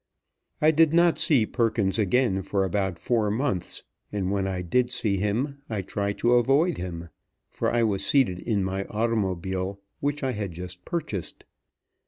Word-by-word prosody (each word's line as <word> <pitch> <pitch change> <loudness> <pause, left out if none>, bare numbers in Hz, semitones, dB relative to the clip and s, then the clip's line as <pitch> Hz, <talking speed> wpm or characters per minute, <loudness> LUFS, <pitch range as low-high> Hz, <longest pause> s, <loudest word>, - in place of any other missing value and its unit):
I 155 - +7
did 160 0 +4
not 170 -1 +4
see 135 -10 +4
Perkins 110 -3 0
again 105 -1 +2
for 100 +1 0
about 95 -1 -1
four 110 +4 +1
months, 110 -4 -1 0.3
and 100 -2 -1
when 100 -1 0
I 90 -1 -2
did 125 +8 +1
see 100 -5 0
him, 120 +9 -1
I 105 -4 -2
tried 100 +1 -2
to 120 +1 +5
avoid 135 +8 +3
him; 85 -2 -5 0.4
for - - -1
I 120 0 +2
was 100 -3 0
seated 115 -8 +2
in 105 -3 0
my 95 +1 -2
automobile, 95 -4 -1 0.2
which 145 0 -2
I 130 - +1
had 105 -6 -4
just 90 +1 -8
purchased. 110 - -4
105 Hz, 165 wpm, -26 LUFS, 95-125 Hz, 0.4 s, I